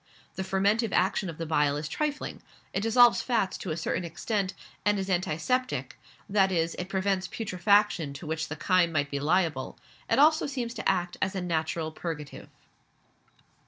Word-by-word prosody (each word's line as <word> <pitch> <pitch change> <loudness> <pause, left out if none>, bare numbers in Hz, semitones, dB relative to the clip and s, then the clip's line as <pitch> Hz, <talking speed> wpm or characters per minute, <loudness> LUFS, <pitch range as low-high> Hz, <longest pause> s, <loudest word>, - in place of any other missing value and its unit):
The - - -4
fermentive 200 +3 +1
action 190 0 +1
of 160 - -7
the 165 - -4
bile 150 -2 +2
is 150 0 -4
trifling; 295 - -3 0.3
it 195 - 0
dissolves 235 +2 +5
fats, 225 -7 0
to 185 - -5
a 155 - -2
certain 170 +2 -2
extent, 190 +3 -2 0.3
and 205 0 +2
is 190 0 -2
antiseptic, 185 +9 -1 0.3
that 195 -1 +3
is, 165 -2 +1
it 180 +1 -4
prevents 190 -1 0
putrefaction 200 -5 +1
to 140 - -9
which 160 +1 -2
the 155 - -5
chyme 170 +2 +2
might 145 -2 0
be 140 - -1
liable; 155 -3 0 0.3
it - - +3
also 310 +2 +5
seems 250 -4 -3
to 225 - -1
act 180 -2 0
as 190 - 0
a 190 - -1
natural 160 -2 -1
purgative. 155 -3 -6
185 Hz, 170 wpm, -28 LUFS, 160-205 Hz, 0.3 s, dissolves